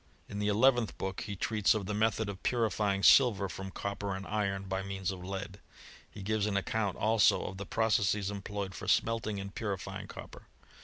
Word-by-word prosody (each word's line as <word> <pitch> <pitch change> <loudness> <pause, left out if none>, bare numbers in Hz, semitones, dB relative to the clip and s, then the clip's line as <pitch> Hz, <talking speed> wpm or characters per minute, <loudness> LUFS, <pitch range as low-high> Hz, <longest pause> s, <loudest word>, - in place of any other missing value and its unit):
In 100 - -6
the 105 - 0
eleventh 120 +2 +3
book 95 -1 -3
he 105 -2 -4
treats 105 +2 +2
of 105 -3 -2
the 105 - -3
method 110 0 +1
of 100 -2 -6
puiifying 105 -4 +1
silver 110 -7 +6
from 95 +1 -6
copper 100 +1 -4
and 95 +1 -6
iron, 100 -2 -1
by 95 0 -2
means 95 -1 -3
of 90 -2 -7
lead. 95 +1 -5 0.5
He 100 - -9
gives 105 0 0
an 105 - -1
accoimt 100 0 -1
also 110 -1 +3
of 95 - -6
the 100 0 -6
processes 105 -2 +1
employed 100 -1 -5
for - - -7
smelting 110 -3 +1
and 100 0 -7
purifying 100 -4 -4
copper. - - -11
100 Hz, 190 wpm, -31 LUFS, 95-110 Hz, 0.5 s, silver